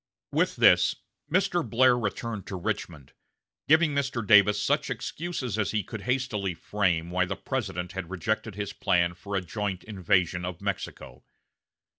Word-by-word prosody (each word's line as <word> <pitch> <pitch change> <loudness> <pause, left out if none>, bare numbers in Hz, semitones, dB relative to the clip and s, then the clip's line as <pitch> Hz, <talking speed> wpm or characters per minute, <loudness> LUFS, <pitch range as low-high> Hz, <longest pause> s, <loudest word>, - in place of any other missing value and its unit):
With - - +1
this, - - +5 0.4
Mr. 180 -1 +2
Blair 125 +2 +4
returned 110 -2 -3
to 95 - -5
Richmond, 85 -5 -4 0.5
giving 160 0 +5
Mr. 140 -5 -1
Davis 105 0 +6
such - - +1
excuses 145 - -4
as 105 - +1
he 105 -2 0
could 110 +3 -7
hastily 110 -6 -1
frame 85 -3 0
why 90 +1 +2
the 95 - -3
President 95 -7 -3
had 95 -3 -6
rejected 110 +3 -2
his 105 -1 -4
plan 85 0 +1
for 100 +3 -6
a 95 - +1
joint 100 +1 -4
invasion 95 -3 0
of 90 -2 -5
Mexico. - - -5
105 Hz, 150 wpm, -27 LUFS, 90-120 Hz, 0.5 s, Davis